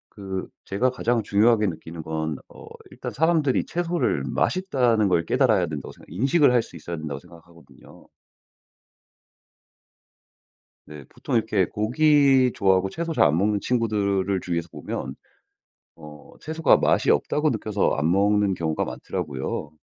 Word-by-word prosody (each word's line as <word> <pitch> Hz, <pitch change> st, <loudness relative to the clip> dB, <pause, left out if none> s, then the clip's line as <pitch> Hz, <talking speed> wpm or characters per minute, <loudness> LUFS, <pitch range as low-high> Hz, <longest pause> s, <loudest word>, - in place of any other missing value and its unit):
그 95 Hz, -2 st, -5 dB, 0.2 s
제가 110 Hz, +7 st, 0 dB
가장 120 Hz, -2 st, 0 dB
중요하게 105 Hz, +2 st, +3 dB
느끼는 80 Hz, -1 st, -6 dB
건 80 Hz, -1 st, -3 dB
어 -, -, -14 dB, 0.2 s
일단 -, -, -7 dB
사람들이 160 Hz, -4 st, +1 dB
채소를 175 Hz, 0 st, -1 dB
맛있다는 125 Hz, -, +1 dB
걸 85 Hz, -2 st, +1 dB
깨달아야 110 Hz, -5 st, +2 dB
된다고 75 Hz, -4 st, -6 dB
생각 -, -, -17 dB
인식을 135 Hz, -, +3 dB
할 120 Hz, -, +4 dB
수 -, -, -15 dB
있어야 85 Hz, +2 st, -6 dB
된다고 75 Hz, -3 st, -5 dB
생각하거든요. 85 Hz, +1 st, -18 dB, 2.8 s
네. 75 Hz, -2 st, -10 dB
보통 -, -, -5 dB
이렇게 110 Hz, -4 st, +2 dB
고기 135 Hz, -, +3 dB
좋아하고 95 Hz, -1 st, +2 dB
채소 165 Hz, 0 st, -4 dB
잘 -, -, +4 dB
안 75 Hz, +1 st, +3 dB
먹는 105 Hz, +1 st, +1 dB
친구들을 100 Hz, -5 st, 0 dB
주위에서 85 Hz, -1 st, -3 dB
보면 -, -, -6 dB, 0.8 s
어 75 Hz, -1 st, -13 dB
채소가 160 Hz, +1 st, +2 dB
맛이 -, -, +2 dB
없다고 150 Hz, +1 st, +1 dB
느껴서 110 Hz, -4 st, 0 dB
안 75 Hz, +3 st, +1 dB
먹는 100 Hz, +1 st, +2 dB
경우가 80 Hz, -3 st, -2 dB
많더라고요. 75 Hz, -3 st, -5 dB
100 Hz, 315 characters per minute, -24 LUFS, 85-125 Hz, 2.8 s, 할